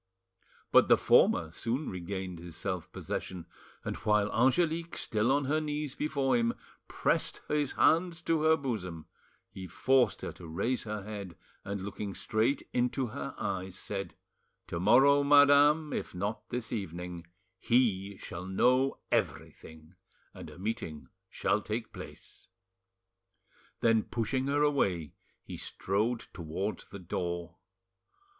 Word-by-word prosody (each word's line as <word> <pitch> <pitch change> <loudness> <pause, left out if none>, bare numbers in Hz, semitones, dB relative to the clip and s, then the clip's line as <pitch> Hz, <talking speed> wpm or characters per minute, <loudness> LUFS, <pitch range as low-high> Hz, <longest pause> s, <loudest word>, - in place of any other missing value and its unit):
But - - +6
the - - +6
former 80 -2 +4
soon 120 - -2
regained 90 -1 -5
his 85 -1 -9
self 90 -3 -4
possession, 90 -3 -5 0.4
and - - -2
while 105 -1 +2
Angelique, 165 +7 +2
still 110 +3 +1
on 140 0 +2
her 155 +3 +1
knees 150 -2 -3
before 140 -4 0
him, 115 -1 +1 0.3
pressed - - 0
his 150 -2 0
hands 170 +1 +3
to 165 -2 +1
her 160 0 +5
bosom, 90 - -4 0.5
he 95 -1 -8
forced 125 +6 +2
her - - -3
to 85 - -11
raise 100 +11 -1
her 105 -2 -4
head, 100 -4 -7 0.3
and 100 0 -4
looking 100 0 -5
straight 115 +5 0
into 125 +2 +1
her 70 -9 -6
eyes, 95 -1 -3
said— 100 -1 -5 0.5
"To 85 - -3
morrow, 135 +9 +6
madame, 145 +2 +6
if - - -4
not 100 +4 -3
this 120 -3 -3
evening, 90 -4 -5 0.3
he 100 -5 +1
shall 90 +1 -7
know 130 +7 +3
everything, 80 +1 -3 0.4
and - - -9
a - - -13
meeting 90 -6 -4 0.2
shall 105 - 0
take 110 +3 -4
place." - - -11 1.3
Then 115 -1 +4
pushing 130 +4 -2
her 145 +1 +2
away, 95 - +1 0.3
he - - -8
strode 110 +5 -1
towards 85 +6 -4
the - - -9
door. 85 -1 -4
110 Hz, 135 wpm, -31 LUFS, 95-135 Hz, 1.3 s, But